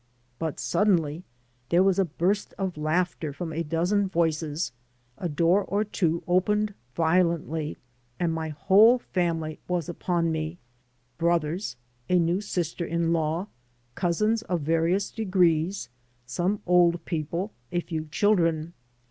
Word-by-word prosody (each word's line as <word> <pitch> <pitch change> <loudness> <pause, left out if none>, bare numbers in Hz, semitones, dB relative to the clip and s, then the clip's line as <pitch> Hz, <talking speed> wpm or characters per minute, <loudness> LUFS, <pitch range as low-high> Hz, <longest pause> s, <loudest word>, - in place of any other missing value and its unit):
But 160 -2 -3
suddenly 175 -5 +1 0.4
there 175 +2 +5
was 195 0 +3
a 195 - +4
burst 180 +5 -1
of 190 -3 -2
laughter 155 0 -1
from 160 +2 -5
a 165 - -1
dozen 175 +6 +1
voices, 160 -2 0 0.5
a 175 - -2
door 170 +6 +3
or 200 +2 0
two 170 -5 -1
opened 210 +4 +2 0.2
violently, 165 -2 +1 0.4
and 170 -2 +1
my 160 -1 -3
whole 200 - +5
family 165 -8 -2
was 175 -4 -1
upon 170 -1 0
me 160 +1 -3 0.3
— 120 0 -42
^brothers, 170 - 0 0.3
a 180 - +4
new 175 +3 +2
sister 175 -4 -2
in 170 0 0
law, 165 +2 0 0.5
cousins 215 - +1
of 180 -6 -2
various 165 +6 +1
degrees, 180 - +1 0.4
some 180 +10 -1
old 175 -1 +3
people, 170 +5 -3 0.2
a 175 - +1
few 160 -2 -4
children. 165 -2 +1
170 Hz, 130 wpm, -26 LUFS, 160-185 Hz, 0.5 s, there